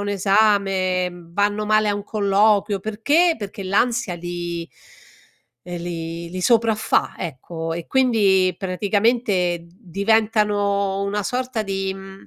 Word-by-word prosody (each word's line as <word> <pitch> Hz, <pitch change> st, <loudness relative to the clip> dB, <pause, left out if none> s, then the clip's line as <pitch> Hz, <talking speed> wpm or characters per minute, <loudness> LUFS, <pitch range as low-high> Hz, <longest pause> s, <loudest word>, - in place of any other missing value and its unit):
un 205 Hz, -, -3 dB
esame, 195 Hz, -2 st, +2 dB, 0.2 s
vanno 205 Hz, +4 st, 0 dB
male 215 Hz, 0 st, +2 dB
a 205 Hz, -, +1 dB
un 205 Hz, -, -4 dB
colloquio, 205 Hz, -1 st, +2 dB
perché? 285 Hz, -, +2 dB
Perché 200 Hz, -1 st, -7 dB
l'ansia 220 Hz, +1 st, 0 dB
li 175 Hz, -1 st, -5 dB, 0.9 s
ehm, 175 Hz, -1 st, -6 dB
li 170 Hz, 0 st, -5 dB
li 185 Hz, 0 st, -5 dB
sopraffà, 225 Hz, 0 st, +2 dB
ecco, 165 Hz, +1 st, -5 dB
e 170 Hz, -1 st, -6 dB
quindi 205 Hz, -8 st, +3 dB
praticamente 200 Hz, -1 st, +1 dB
d -, -, -21 dB
diventano 205 Hz, -1 st, +1 dB
una 200 Hz, +1 st, -2 dB
sorta 250 Hz, 0 st, -2 dB
di, 195 Hz, -1 st, -2 dB
mhmm, 195 Hz, 0 st, -12 dB
200 Hz, 120 wpm, -21 LUFS, 185-215 Hz, 0.9 s, quindi